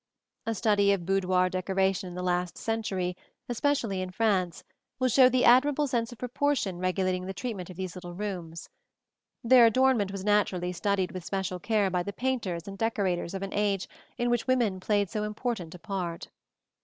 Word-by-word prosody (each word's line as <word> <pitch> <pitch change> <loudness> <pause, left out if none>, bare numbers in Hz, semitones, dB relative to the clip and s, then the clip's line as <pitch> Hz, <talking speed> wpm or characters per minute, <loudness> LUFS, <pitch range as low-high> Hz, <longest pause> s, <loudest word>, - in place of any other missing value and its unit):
A 225 - 0
study 205 -1 +3
of 180 -4 -3
boudoir 185 -1 +2
decoration 190 0 0
in 175 - -9
the 180 - -4
last 180 -1 -1
century, 195 -5 -2 0.3
especially 240 -6 0
in 185 - -4
France, 185 -3 0 0.3
will 255 0 +1
show 255 +2 +6
the 255 0 +2
admirable 285 +4 +5
sense 240 -4 -1
of 240 - -10
proportion 250 -6 -1
regulating 185 0 0
the 190 - -5
treatment 200 -8 -5
of 180 - -10
these 185 -2 -4
little 175 -1 -8
rooms 175 -5 -5
(see - - -13
Plate - - -40
XL). - - -19
Their 255 -2 +8
adornment 235 -4 +3
was 195 -1 -6
naturally 195 -4 +1
studied 190 +1 0
with 185 -2 -6
special 190 -1 -3
care 205 0 +1
by 180 -1 +1
the 200 +3 -5
painters 215 -9 -2
and 195 0 -8
decorators 195 -6 -1
of 195 - -4
an 195 - -5
age 205 -2 0 0.3
in 240 0 0
which 240 +1 0
women 235 -7 +2
played 205 +1 +1
so 215 - -2
important 210 -5 -3
a - - -11
part. 180 -4 -4
195 Hz, 190 wpm, -28 LUFS, 185-230 Hz, 0.3 s, Their